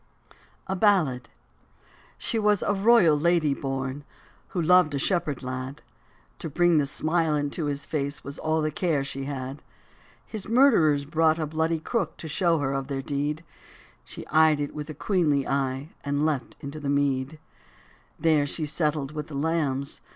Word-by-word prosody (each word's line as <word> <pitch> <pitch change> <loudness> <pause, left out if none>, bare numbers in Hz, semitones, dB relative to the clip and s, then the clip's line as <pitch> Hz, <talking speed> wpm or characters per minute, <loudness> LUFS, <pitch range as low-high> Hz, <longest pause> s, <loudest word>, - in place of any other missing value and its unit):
A 190 - -2
BALLAD. 180 - +2 0.9
SHE 230 - -2
was 210 -2 +2
a 205 - +1
royal 200 -5 +5
lady 155 -1 +2
born. 135 +1 -4 0.4
Who 180 - -4
loved 170 -2 +4
a - - 0
shepherd 150 -3 -1
lad; 130 +2 -5 0.6
To 160 - -5
bring 175 +1 +3
the 140 - +1
smile 155 +2 +1
into 145 +2 -1
his 145 0 -3
face 140 -2 -3
Was 140 +1 -6
all 155 0 0
the 155 - 0
care 155 -3 0
she 135 0 -4
had. 135 0 -5 0.6
His 215 -3 -6
murderers 215 - +4
brought 160 +1 +2
a 160 - -1
bloody 160 +2 0
crook 230 +9 -2
To 160 - -7
show 170 +1 +2
her 135 -2 -1
of 135 -1 -3
their 135 -1 -3
deed: 145 +3 -2 0.6
She - - -9
eyed 155 -1 +4
it 145 -1 -3
with 150 0 -6
a 155 - -6
queenly 155 -6 +1
eye; 135 +1 -1
And 145 +1 0
leapt 145 -6 -2
into 140 +2 -6
the 145 -2 -3
mead. 140 0 0
And - - -31 0.9
there 150 -3 +4
she 155 +2 -2
settled 150 -2 -1
with 150 -1 -5
the 150 - -8
lambs. 145 -3 -1
150 Hz, 170 wpm, -26 LUFS, 140-165 Hz, 0.9 s, royal